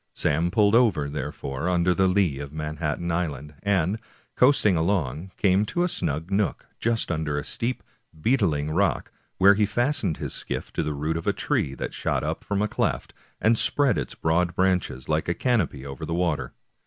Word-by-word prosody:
Sam 80 +4 +1
pulled 105 +2 +3
over, 110 -12 +4
therefore, 70 +1 -4
under 90 0 +3
the 95 +1 +3
lee 90 -7 +2
of 70 -1 -6
Manhattan 75 +2 -3
Island, 75 -4 -3
and, 100 0 +1 0.4
coasting 125 -7 +4
along, 80 -2 0
came 95 0 +3
to 175 - 0
a - - +2
snug 80 - -2
nook, 100 +1 0
just 115 -4 0
under 80 -3 -1
a 75 - -2
steep, 120 - -3 0.4
beetling 80 - +1
rock, 95 +5 0 0.3
where 100 +2 +7
he 105 0 +2
fastened 120 - 0
his - - -5
skiff - - -5
to - - 0
the 75 - -2
root 75 +3 -1
of 85 - -6
a - - +3
tree 70 - -1
that - - -5
shot - - -1
out - - -3
from 100 0 -1
a - - +1
cleft, - - -2 0.3
and 110 +1 +3
spread 145 -2 +2
its - - -5
broad 85 +2 +1
branches 90 -8 0
like 75 0 0
a 85 - 0
canopy 95 - 0
over 70 -1 -7
tha 85 - -2
water. 80 -8 -1
85 Hz, 185 wpm, -25 LUFS, 75-100 Hz, 0.4 s, where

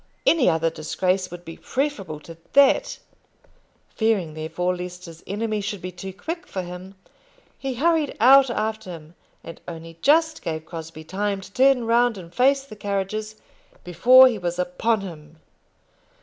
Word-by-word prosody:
Any 315 - +4
other 165 -1 +1
disgrace 185 +4 -1
would 175 0 -10
be 165 - -9
preferable 250 - -3
to 165 +2 -11 0.2
that. 280 -1 +4 0.9
Fearing, 210 -8 0
therefore, 180 +3 -2
lest 180 0 -7
his 165 -1 -12
enemy 215 +1 -2
should 205 0 -4
be 180 +1 -6
too 185 +2 -8
quick 330 - -6
for 185 - -4
him, 180 +2 -9 0.6
he 270 -2 -3
hurried 315 +2 +1
out 265 +3 +7
after 220 -3 -3
him, 165 -2 -10 0.3
and 165 - -10
only 165 -1 -9
just 320 +2 +3
gave 160 -1 -4
Crosbie 165 -1 -8
time 200 +4 -2
to 195 - -13
turn 265 -2 +4
round 235 -1 +2
and 175 -2 -11
face 270 +2 +3
the 270 -6 -12
carriages 205 +2 -3 0.5
before 255 +9 +7
he 230 -5 -1
was 175 -1 -3
upon 180 +5 0
him. 160 -4 -10
195 Hz, 155 wpm, -23 LUFS, 175-240 Hz, 0.9 s, out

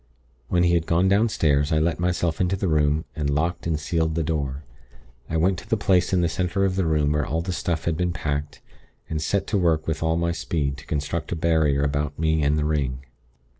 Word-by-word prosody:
When 90 -1 +2
he 85 0 +3
had 85 -1 +1
gone 85 +3 +3
downstairs, 85 -8 +2
I 80 - +3
let 80 0 +1
myself 90 -2 0
into 90 +1 +1
the 95 0 -2
room, 75 0 +2
and 75 -2 -1
locked 85 +5 -1
and 80 -2 0
sealed 80 0 -1
the 85 - 0
door. 75 -2 -2 0.7
I 80 - 0
went 90 +3 +2
to 110 - -15
the 110 - +2
place 95 -3 +2
in 95 -2 +2
the 85 - +2
center 90 +3 0
of 95 -1 0
the 95 -3 0
room 75 -2 +2
where 75 0 +1
all 80 +4 -2
the 90 +1 -3
stuff 85 -2 -2
had 85 -2 0
been 90 0 0
packed, 75 -3 -3 0.5
and 80 -1 -1
set 100 +6 0
to 105 - 0
work 80 -3 +2
with 80 -1 -2
all 80 0 +1
my 85 0 0
speed 70 -5 -2
to - - -13
construct 75 +2 -3
a - - -2
barrier 80 -4 +2
about 70 0 -1
me 80 0 +1
and 75 +1 +2
the 75 - 0
ring. 70 -4 -1
80 Hz, 230 wpm, -24 LUFS, 75-85 Hz, 0.7 s, he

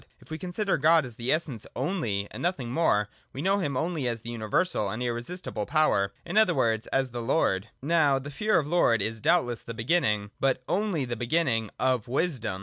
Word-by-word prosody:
If - - -18
we 160 - -4
consider 190 +2 -1
God 160 0 +5
as 120 -3 -8
the 120 +2 -1
Essence 150 -9 -1
only, 120 - -1
and - - -7
nothing 140 -9 -1
more, 115 -9 +2 0.3
we 135 +4 -5
know 195 +1 +2
him 145 -8 -1
only 160 -3 -1
as 115 -2 -2
the 115 +1 -7
universal 110 - 0
and 110 +5 -3
irresistible 120 - -4
Power; 145 -11 +2
in 175 +5 -3
other 185 -6 +4
words, 110 0 +1
as 135 -2 0
the 120 0 -4
Lord. 115 -6 +1 0.2
Now 150 -3 +3
the 140 +2 -6
fear 215 +9 +1
of 150 - +1
the 150 - -7
Lord 115 -10 +4
is, 110 0 -3
doubtless, 145 -8 +2
the 115 - -8
beginning, 115 -5 +1
— - - -44
but 130 -1 +1
only 190 -8 0
the 120 -1 -3
beginning, 120 -3 0
of 130 -4 +1
wisdom. 125 - -1
130 Hz, 210 wpm, -27 LUFS, 115-165 Hz, 0.3 s, God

